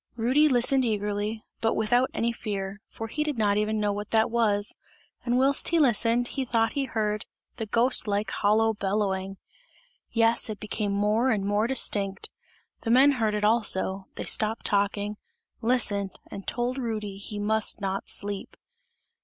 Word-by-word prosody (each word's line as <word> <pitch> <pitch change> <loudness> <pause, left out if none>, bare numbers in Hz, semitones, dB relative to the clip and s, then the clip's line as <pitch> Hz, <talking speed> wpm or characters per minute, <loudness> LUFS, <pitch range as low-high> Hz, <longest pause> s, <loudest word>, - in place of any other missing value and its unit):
Rudy 255 +7 +3
listened 260 0 +3
eagerly, 210 -1 -2 0.2
but 225 - +1
without 245 +4 +2
any 235 +1 0
fear, 200 -3 -5
for 225 - -7
he 300 +7 -2
did 300 -4 -3
not 205 -2 +2
even 215 +1 0
know 205 -1 0
what 205 +1 -5
that 220 0 +2
was, 210 -3 +1 0.5
and 245 0 +1
whilst 270 +2 +3
he 335 - +2
listened 240 -4 +2
he 270 - -2
thought 230 -2 +1
he 280 -2 -1
heard 215 -4 -2 0.3
the 225 - -4
ghost 235 +2 +3
like 205 0 -1
hollow 220 +2 +2
bellowing! 195 -2 -2 0.7
Yes, 230 0 +2
it 215 - -5
became 210 -1 -2
more 210 +5 +1
and 205 -5 0
more 205 +2 +1
distinct, 200 -6 +1 0.5
the 225 - -4
men 265 +4 +6
heard 225 -6 0
it 210 0 0
also, 195 -3 +1
they - - -5
stopped 220 +1 0
talking, 205 +1 0 0.4
listened 210 -5 0
and 195 - -8
told 250 +2 -2
Rudy 215 -5 -4
he 205 +1 -7
must 215 +1 +1
not 195 -1 -3
sleep. 200 -1 -1
215 Hz, 160 wpm, -26 LUFS, 205-235 Hz, 0.7 s, men